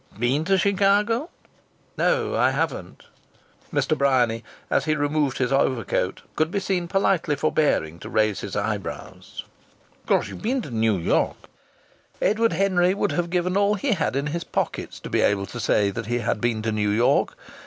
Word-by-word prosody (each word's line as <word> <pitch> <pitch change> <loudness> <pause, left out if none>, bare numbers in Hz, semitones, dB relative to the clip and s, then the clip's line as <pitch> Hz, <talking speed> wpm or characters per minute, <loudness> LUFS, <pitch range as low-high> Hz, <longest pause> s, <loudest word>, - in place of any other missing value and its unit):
"Been 130 +7 +1
to 195 +1 +3
Chicago?" 205 - +2 0.7
"No, 475 -3 +1
I - - +4
haven't." - - -3 0.7
Mr. 155 - +1
Bryany, 125 -5 +2 0.2
as - - +1
he 155 -1 +1
removed 145 -2 0
his 125 -1 0
overcoat, 120 -8 0
could 155 +1 +1
be 200 - -1
seen 185 -3 -1
politely 185 -5 +1
forbearing 140 - 0
to - - -8
raise 110 -2 +1
his - - -6
eyebrows. - - -5 0.6
"Of - - -32
course - - +2
you've - - -9
been 245 +3 -1
to - - -8
New 110 -2 +1
York?" 85 - +1 0.8
Edward 225 +2 +2
Henry 185 -1 +2
would 205 - 0
have 175 -1 -1
given 180 +1 0
all 200 +1 +3
he 265 +5 -1
had 165 -10 0
in 140 +1 0
his 170 0 -2
pockets - - -3
to - - -7
be - - +2
able 100 -1 +2
to 120 - -8
say 100 -3 +2
that 110 +2 -5
he 120 +1 0
had 115 -3 -1
been 115 -2 0
to 115 - 0
New 105 -1 0
York. 115 +4 +2
155 Hz, 175 wpm, -24 LUFS, -, 0.8 s, I